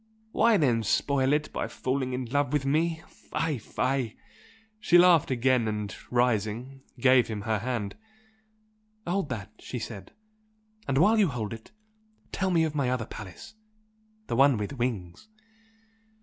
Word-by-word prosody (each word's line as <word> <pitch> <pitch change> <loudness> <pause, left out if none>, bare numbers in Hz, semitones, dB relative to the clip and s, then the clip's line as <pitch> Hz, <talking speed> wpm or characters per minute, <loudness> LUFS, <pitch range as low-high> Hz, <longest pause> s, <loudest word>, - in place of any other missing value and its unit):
Why 230 -1 +4
then 125 -9 +2
spoil 135 +5 +1
it 150 +1 0
by - - -2
falling 130 0 -2
in 125 0 -2
love 145 +3 0
with 145 -2 +1
me? 160 +3 0
Fie, 155 -6 -3
fie!" 130 +1 -2 0.6
She 175 -4 +4
laughed 175 -3 +6
again 130 -2 +2
and 105 -2 -3
rising, 120 +2 0 0.2
gave 130 0 +5
him 110 -2 -4
her 110 0 -1
hand. 115 -3 -3 1.1
"Hold 180 -2 -1
that!" 110 -4 -5
she 125 - -6
said 110 -5 -7 0.8
"And 135 -1 0
while 215 +9 +5
you 205 - +5
hold 115 -7 -4
it, 115 0 -11 0.6
tell 190 -1 -1
me 170 -3 +3
of 155 -2 -1
my 140 -4 0
other 125 -3 -1
palace 95 - -10 0.7
the - - -3
one 135 0 +5
with 105 +4 -4
wings!" 120 - -4
130 Hz, 150 wpm, -27 LUFS, 115-145 Hz, 1.1 s, laughed